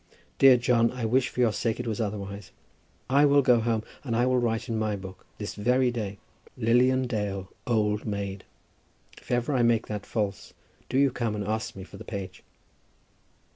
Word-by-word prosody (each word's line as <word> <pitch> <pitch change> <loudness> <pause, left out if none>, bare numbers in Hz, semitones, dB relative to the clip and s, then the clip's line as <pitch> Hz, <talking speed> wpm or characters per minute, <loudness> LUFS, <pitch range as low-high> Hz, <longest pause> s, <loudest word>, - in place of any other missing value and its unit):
Dear 135 -2 +8
John, 120 -1 +3
I 125 -2 -4
wish 125 +3 +2
for 125 - -2
your 115 -3 +3
sake 115 +1 -1
it 125 - -3
was 110 -1 -2
otherwise. 100 -2 -5 0.6
I 140 +3 +4
will 140 -1 +5
go 125 -2 +5
home 115 -1 0 0.2
and 120 -5 -2
I 120 +2 +3
will 130 0 +2
write 115 0 -1
in 115 -2 -2
my 110 -1 0
book, 95 -1 -10
this - - -5
very 125 +4 +2
day, 105 -4 -4 0.4
Lilian 125 +2 +3
Dale, 100 -5 -3 0.2
Old 105 -3 +1
Maid. 100 -2 -4 0.8
If - - -20
ever 125 +4 0
I 130 - +2
make 115 -1 +3
that 105 -2 -5
false, 105 -3 -3 0.3
do 130 - 0
you 140 -1 +4
come 115 -3 -2
and 105 -1 -3
ask 110 +1 -2
me 95 - -8
for - - -12
the - - -9
page." 100 -3 -7
115 Hz, 190 wpm, -27 LUFS, 105-125 Hz, 0.8 s, Dear